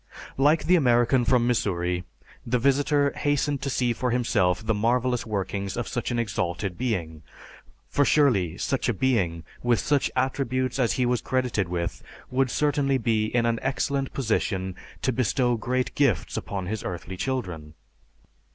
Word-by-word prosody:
Like 150 +4 +4
the 180 - +4
American 120 -4 +3
from 120 -1 +3
Missouri, 90 -7 0 0.4
the 125 +2 0
visitor 140 +2 +2
hastened 145 -1 0
to 140 - -2
see 125 -2 +1
for 125 +2 -2
himself 110 -5 +1
the 110 - +2
marvelous 120 +3 0
workings 100 -1 -3
of 120 - -2
such 120 - -3
an 120 - -1
exalted 100 -4 -2
being, 85 -11 -3 0.7
for 145 - +2
surely 105 - +3
such 135 +2 -1
a 120 - 0
being, 95 -9 0 0.2
with 120 -2 +2
such 145 -2 +1
attributes 130 0 -1
as 120 -3 +2
he 125 - +1
was 120 -1 +1
credited 125 -8 -1
with, 85 -1 -3 0.3
would 130 0 +2
certainly 140 -1 +1
be 110 -3 +1
in 120 +1 +1
an 115 -1 +1
excellent 135 0 -1
position 100 -6 -1 0.3
to 130 - +1
bestow 125 +1 +1
great 125 +3 -1
gifts 135 - +1
upon 95 -2 -4
his 110 +3 -4
earthly 90 +1 -5
children. 90 - -4
120 Hz, 155 wpm, -26 LUFS, 100-130 Hz, 0.7 s, Like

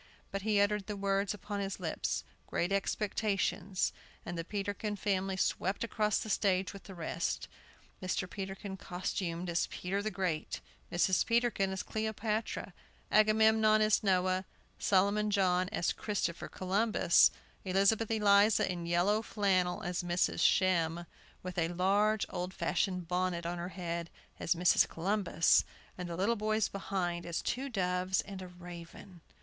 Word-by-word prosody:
But 195 - -3
he 210 0 +2
uttered 205 -1 +1
the 210 - -3
words 195 0 0
upon 205 0 -5
his 195 -1 -3
lips, 165 -4 -2 0.2
"Great 175 +2 -1
Expectations;" 200 -1 0 0.3
and 175 - -4
the 165 - -3
Peterkin 205 +2 -3
family 195 -1 -1
swept 190 +1 0
across 215 -2 +1
the - - -3
stage 195 -2 +1
with 200 - -11
the 195 - -9
rest: 170 0 -2 0.5
Mr. 185 0 -1
Peterkin 195 +1 -6
costumed 180 -1 -3
as 170 0 0
Peter 195 +3 -3
the 215 - -1
Great, 180 -5 -2 0.3
Mrs. 180 +2 +3
Peterkin 230 -4 +1
as 190 -1 -3
Cleopatra, 220 0 -2 0.4
Agamemnon 215 0 +5
as 215 -1 +3
Noah, 185 -1 +1 0.3
Solomon 205 +2 +2
John 185 -2 +2
as 195 -5 0
Christopher 200 -5 -2
Columbus, 195 0 +3 0.3
Elizabeth 200 +4 +2
Eliza 210 -1 +4
in 175 -1 -5
yellow 180 +5 +2
flannel 195 -3 0
as 180 -1 -2
Mrs. 175 0 0
Shem, 175 -2 +2 0.4
with 180 -1 -4
a 165 - +2
large, 200 +5 +2
old 180 +1 -4
fashioned 180 -3 -1
bonnet 180 -1 -1
on 175 +1 -3
her 175 +1 -4
head 170 -2 -4 0.3
as 170 - +1
Mrs. 180 +1 +4
Columbus, 180 -2 +2 0.3
and 180 -1 -6
the 170 - -4
little 205 +5 +2
boys 215 -1 0
behind 180 -3 -2
as 170 -1 -3
two 270 +2 -2
doves 185 -3 0
and 195 -2 -8
a 185 - -7
raven. 175 0 -11
190 Hz, 145 wpm, -32 LUFS, 180-210 Hz, 0.5 s, Agamemnon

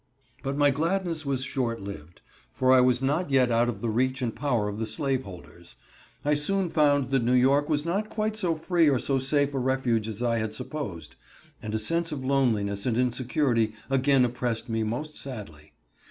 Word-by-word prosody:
But 135 0 -3
my 145 -1 +4
gladness 165 +1 -1
was 135 -2 0
short 125 -3 -2
lived, 85 -5 -9 0.3
for 130 - +2
I 130 -1 +7
was 125 0 +2
not 145 +5 0
yet 130 -3 +3
out 120 +1 +3
of 105 -4 -5
the 115 - -1
reach 130 +3 0
and 115 -2 -2
power 120 -5 0
of 105 +1 -5
the 110 - -2
slave 135 +2 -1
holders. 85 -2 -12 0.5
I 150 - +3
soon 180 +5 +1
found 145 -4 +2
that 135 -3 +1
New 125 +2 +2
York 140 +4 +3
was 150 0 0
not 200 +5 -1
quite 215 0 -2
so 180 -6 0
free 165 0 +2
or 135 - +3
so 135 +2 0
safe 140 +2 +1
a 135 - -1
refuge 125 -4 0
as 110 +2 -4
I 115 -1 +1
had 110 -1 -3
supposed, 95 - -6 0.4
and 110 0 -4
a - - +2
sense 165 +10 -1
of 135 -3 -5
loneliness 110 -7 +1
and 115 -2 0
insecurity 125 -2 +1 0.2
again 135 -1 +4
oppressed 120 -1 -3
me 115 0 -1
most 125 +8 -4
sadly. 100 - -9
130 Hz, 195 wpm, -27 LUFS, 115-145 Hz, 0.5 s, I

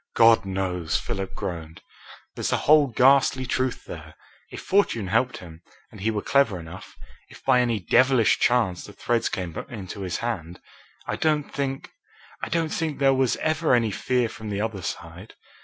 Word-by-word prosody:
"God 115 -2 +6
knows!" 90 -4 -1
Philip 95 +3 -4
groaned. 80 -2 -6 0.5
"There's - - -3
the - - +1
whole 150 -1 +6
ghastly 130 +1 +3
truth 130 0 -2
there, - - -10 0.3
if - - -8
fortune 185 - +1
helped 115 +5 +1
him, 85 -2 -12 0.3
and - - -12
he 110 - +1
were 105 -2 -2
clever 135 -10 +2
enough, 85 +3 -11 0.3
if - - -16
by 130 -2 +4
any 120 -3 0
devilish 125 +5 +3
chance 115 -8 +1
the 105 - -12
threads 115 +1 0
came 90 -4 -4
into 100 -4 -7
his 90 -2 -3
hand. 90 -8 -4 0.5
I - - -3
don't 150 -2 0
think 135 -1 -3 0.5
I - - -4
don't 165 -2 -1
think 160 -3 -2
there 135 -1 +4
was 130 -2 +2
ever 155 -3 +1
any 115 -3 +1
fear 125 +3 0
from 110 -1 -8
the 100 -1 -3
other 105 -3 -3
side. - - -7
115 Hz, 175 wpm, -25 LUFS, 95-135 Hz, 0.5 s, God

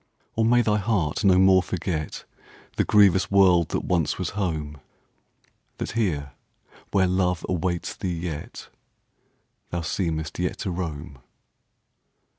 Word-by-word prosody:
Or 115 - +1
may 120 +2 +4
thy 105 -1 +2
heart 100 -6 -1
no 95 -2 +5
more 95 0 +6
forgetThe 85 -3 -4 0.6
grievous 95 -3 +4
world 90 -4 +4
that - - -2
once 85 -4 0
was - - -3
home. 80 -7 -3 1.0
That - - -4
here, 80 -11 -1 0.6
where 95 -2 +3
love 90 -2 0
awaits 90 -1 -2
thee 90 -2 -3
yet, 80 -3 -6 1.0
Thou 85 - -3
seemest 80 -2 -3
yet 90 0 -1
to 95 - -2
roam? 80 -5 -5
90 Hz, 120 wpm, -24 LUFS, 80-95 Hz, 1.0 s, more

